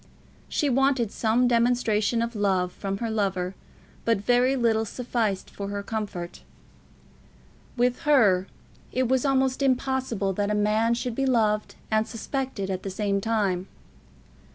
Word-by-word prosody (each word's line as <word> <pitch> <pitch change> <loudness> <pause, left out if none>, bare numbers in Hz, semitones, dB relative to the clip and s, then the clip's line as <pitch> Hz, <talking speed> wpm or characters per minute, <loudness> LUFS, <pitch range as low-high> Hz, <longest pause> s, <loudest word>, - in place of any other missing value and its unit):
She 295 - 0
wanted 265 -4 +2
some 235 +2 +2
demonstration 235 -2 +2
of 235 0 -4
love 190 -3 +1
from 195 +1 -4
her 230 +1 -3
lover, 190 -4 -1 0.5
but 230 -2 +2
very 245 +5 +2
little 230 -3 +2
sufficed 225 -4 -2
for 200 - -6
her 200 0 -4
comfort. 200 -6 -5 1.4
With 245 +1 +2
her 205 -11 +4 0.4
it 255 0 +1
was 260 +1 +1
almost 265 0 +1
impossible 260 -6 0
that 205 +2 -1
a 210 - +1
man 215 +3 +2
should 245 0 -3
be 270 +3 0
loved 215 -4 +1 0.2
and 220 0 +2
suspected 240 -4 -3
at 190 0 -3
the 195 - -5
same 200 0 -1
time. 200 -4 0
225 Hz, 140 wpm, -26 LUFS, 200-250 Hz, 1.4 s, her